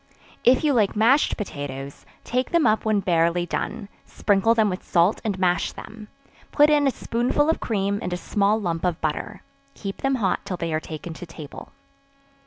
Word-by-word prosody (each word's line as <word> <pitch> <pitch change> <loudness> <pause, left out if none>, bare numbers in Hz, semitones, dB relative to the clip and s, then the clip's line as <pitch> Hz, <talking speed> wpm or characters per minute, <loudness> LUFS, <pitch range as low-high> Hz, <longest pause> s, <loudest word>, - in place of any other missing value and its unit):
If 255 +4 +4
you 295 -2 +3
like 215 -5 +2
mashed 240 +7 +3
potatoes, 140 - -6 0.2
take 250 +2 -1
them 340 -2 +2
up 215 -1 +2
when 215 -2 +2
barely 170 -1 +1
done, 200 - -4 0.2
sprinkle 205 +3 +1
them 220 -2 +3
with 185 -1 -3
salt 175 +3 +2
and 205 -4 -2
mash 180 -2 +1
them; 215 -1 -10 0.4
put 295 +1 +5
in 290 -1 +4
a - - +3
spoonful 250 +7 0
of - - -3
cream 200 -2 -1
and - - -4
a 180 - -1
small 205 +3 +1
lump 170 -5 -3
of 180 -3 0
butter; 180 +6 -3 0.3
keep 195 -1 -6
them 270 0 0
hot 195 -7 0
till 180 - -4
they 165 -2 -3
are 155 - +1
taken 160 +1 -7
to 175 +2 -9
table. 155 -3 -10
200 Hz, 190 wpm, -24 LUFS, 175-230 Hz, 0.4 s, put